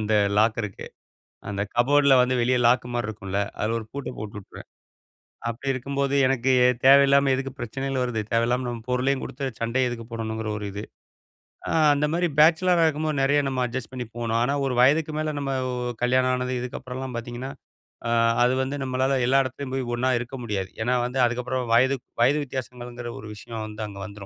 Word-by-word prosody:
அந்த 110 Hz, 0 st, -1 dB, 0.3 s
லாக்கருக்கு. 110 Hz, -2 st, 0 dB, 0.6 s
அந்த 100 Hz, -1 st, -2 dB
கபோர்ட்ல 140 Hz, +3 st, +4 dB
வந்து 125 Hz, +1 st, +1 dB
வெளிய 125 Hz, +2 st, +2 dB
லாக்குமாரி 120 Hz, -1 st, +1 dB
இருக்கும்ல! 100 Hz, -2 st, -4 dB, 0.2 s
அதில 110 Hz, +2 st, 0 dB
ஒரு 110 Hz, -, -9 dB
பூட்ட 140 Hz, -1 st, -5 dB
போட்டு 105 Hz, 0 st, -7 dB
விட்டுருவேன். 95 Hz, -, -13 dB, 0.8 s
அப்பிடி 125 Hz, +4 st, -2 dB
இருக்கும்போது, 140 Hz, +2 st, -2 dB
எனக்கு 130 Hz, 0 st, +1 dB, 0.3 s
தேவையில்லாம 140 Hz, 0 st, +6 dB
எதுக்கு 135 Hz, 0 st, -3 dB
பிரச்சனைகள் 135 Hz, +3 st, -2 dB
வருது? 125 Hz, -3 st, -1 dB
தேவையில்லாம 120 Hz, +2 st, +1 dB
நம்ம 120 Hz, -2 st, -5 dB
பொருளையும் 130 Hz, +2 st, +1 dB
குடுத்து, 135 Hz, +1 st, -5 dB
சண்டையும் 125 Hz, +2 st, +1 dB
எதுக்கு 115 Hz, -2 st, -6 dB
போடணுங்கிற 110 Hz, -1 st, -3 dB
ஒரு 105 Hz, -, -5 dB
இது. 100 Hz, +2 st, -5 dB, 0.9 s
ஆ -, -, -1 dB, 0.2 s
அந்த 145 Hz, +1 st, +1 dB
மாரி 175 Hz, +1 st, +1 dB
பேச்சிலரா 170 Hz, +2 st, +5 dB
இருக்கும்போது, 155 Hz, -1 st, -1 dB
நெறையா 145 Hz, +1 st, +3 dB
நம்ம 130 Hz, -1 st, -2 dB
அட்ஜஸ்ட் 125 Hz, 0 st, -5 dB
பண்ணி 125 Hz, -1 st, -4 dB
போனோம். 115 Hz, -1 st, 0 dB
ஆனா, 135 Hz, +3 st, +1 dB
ஒரு 130 Hz, -, -1 dB
வயதுக்கு 150 Hz, +4 st, +3 dB
மேல, 155 Hz, 0 st, -1 dB
நம்ம 135 Hz, -1 st, -2 dB, 0.2 s
ஒ -, -, -4 dB, 0.3 s
கல்யாணம் 130 Hz, +1 st, +3 dB
ஆனது, 125 Hz, 0 st, -2 dB
இதுக்கப்புறம் 125 Hz, 0 st, -6 dB
எல்லாம் 130 Hz, -2 st, -5 dB
பாத்தீங்கன்னா, 120 Hz, +3 st, -6 dB, 0.6 s
அ -, -, -1 dB, 0.3 s
அது 125 Hz, +1 st, +3 dB
வந்து 135 Hz, +2 st, -3 dB
நம்மளால 130 Hz, +1 st, 0 dB
எல்லா 135 Hz, +2 st, +4 dB
எடத்துலயும் 130 Hz, +1 st, -6 dB
போயி, 130 Hz, -1 st, -2 dB
ஒன்னா 130 Hz, +2 st, 0 dB
இருக்க 120 Hz, +2 st, -6 dB
முடியாது. 100 Hz, -4 st, -3 dB
ஏன்னா 125 Hz, +2 st, +1 dB
வந்து, 125 Hz, +2 st, -3 dB
அதுக்கு 120 Hz, +1 st, -1 dB
அப்புறம் 130 Hz, 0 st, -2 dB
வயது 130 Hz, +3 st, +4 dB, 0.3 s
வயது 145 Hz, +4 st, +3 dB
வித்தியாசங்கள்ங்குற 120 Hz, -1 st, -6 dB
ஒரு 105 Hz, -, -9 dB
விஷயம் 110 Hz, 0 st, -7 dB
வந்து 105 Hz, 0 st, -6 dB
அங்க 100 Hz, -, -10 dB
வந்துரும். 100 Hz, +1 st, -6 dB
125 Hz, 180 wpm, -25 LUFS, 115-135 Hz, 0.9 s, தேவையில்லாம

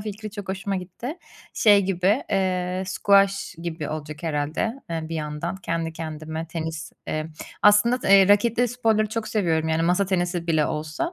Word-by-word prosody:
fikri 215 Hz, +1 st, -6 dB
çok 205 Hz, -2 st, -8 dB
hoşuma 195 Hz, +1 st, -2 dB
gitti. 190 Hz, -, -6 dB, 0.3 s
Şey, 205 Hz, -3 st, +5 dB
gibi, 190 Hz, +6 st, +1 dB
eee, 185 Hz, -1 st, 0 dB
squash 195 Hz, 0 st, +2 dB
gibi 160 Hz, -3 st, -4 dB
olacak 155 Hz, 0 st, -6 dB
herhâlde, 160 Hz, -, -2 dB
eee, 160 Hz, -1 st, -3 dB
bir 165 Hz, -, -4 dB
yandan 150 Hz, +4 st, -4 dB
kendi 165 Hz, -3 st, -3 dB
kendime 160 Hz, 0 st, -5 dB
tenis, 160 Hz, -1 st, -5 dB
eee, 155 Hz, 0 st, -2 dB, 0.4 s
aslında, 210 Hz, +4 st, +5 dB
t -, -, -3 dB
eee, 195 Hz, 0 st, +7 dB
raketli 235 Hz, +4 st, +3 dB
sporları 225 Hz, -2 st, +1 dB
çok 220 Hz, 0 st, -3 dB
seviyorum. 165 Hz, -6 st, 0 dB
Yani, 160 Hz, +1 st, +1 dB
masa 180 Hz, +4 st, +2 dB
tenisi 175 Hz, -2 st, -1 dB
bile 155 Hz, -3 st, +2 dB
olsa. 155 Hz, -, -3 dB
185 Hz, 160 wpm, -24 LUFS, 160-205 Hz, 0.4 s, eee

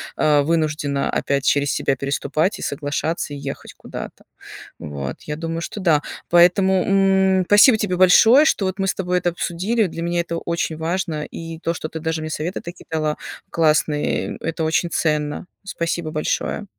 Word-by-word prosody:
а, 150 Hz, -1 st, +3 dB
вынуждена 150 Hz, -2 st, 0 dB
опять 140 Hz, -1 st, -1 dB
через 145 Hz, 0 st, +2 dB
себя 135 Hz, -, 0 dB
переступать 140 Hz, +7 st, -1 dB
и -, -, -7 dB
соглашаться 145 Hz, +1 st, -3 dB
ехать 140 Hz, -, -7 dB
куда-то, -, -, -9 dB, 0.5 s
вот. 70 Hz, -2 st, -6 dB
Я 150 Hz, -, -4 dB
думаю, 165 Hz, 0 st, -4 dB
что 205 Hz, -, -6 dB
да. 160 Hz, -5 st, +3 dB, 0.3 s
Поэтому, 180 Hz, +2 st, +4 dB
м, 190 Hz, -1 st, +3 dB
спасибо 215 Hz, +3 st, +7 dB
тебе 205 Hz, -4 st, -1 dB
большое, 225 Hz, +10 st, +7 dB
что 205 Hz, -, +2 dB
вот 185 Hz, 0 st, -2 dB
мы 195 Hz, -, -1 dB
с -, -, +1 dB
тобой 180 Hz, -1 st, -1 dB
это 180 Hz, 0 st, +1 dB
обсудили, 190 Hz, +6 st, -1 dB
для 165 Hz, 0 st, -6 dB
меня 170 Hz, 0 st, -1 dB
это 170 Hz, 0 st, -4 dB
очень 170 Hz, -2 st, -2 dB
важно, 160 Hz, -2 st, -2 dB
и 165 Hz, -1 st, -8 dB
то, 165 Hz, 0 st, -1 dB
что 155 Hz, -, -6 dB
ты 160 Hz, -, -6 dB
даже 160 Hz, 0 st, -2 dB
мне 155 Hz, -, -5 dB
совета 160 Hz, +4 st, -4 dB
такие 170 Hz, +1 st, -10 dB
дала 155 Hz, -1 st, -1 dB, 0.3 s
классные, 155 Hz, -2 st, +1 dB
э, -, -, -10 dB
это 165 Hz, 0 st, -3 dB
очень 165 Hz, +2 st, 0 dB
ценно. 150 Hz, +2 st, -1 dB, 0.2 s
Спасибо 170 Hz, -3 st, -3 dB
большое. 155 Hz, +6 st, -2 dB
165 Hz, 170 wpm, -21 LUFS, 150-185 Hz, 0.5 s, спасибо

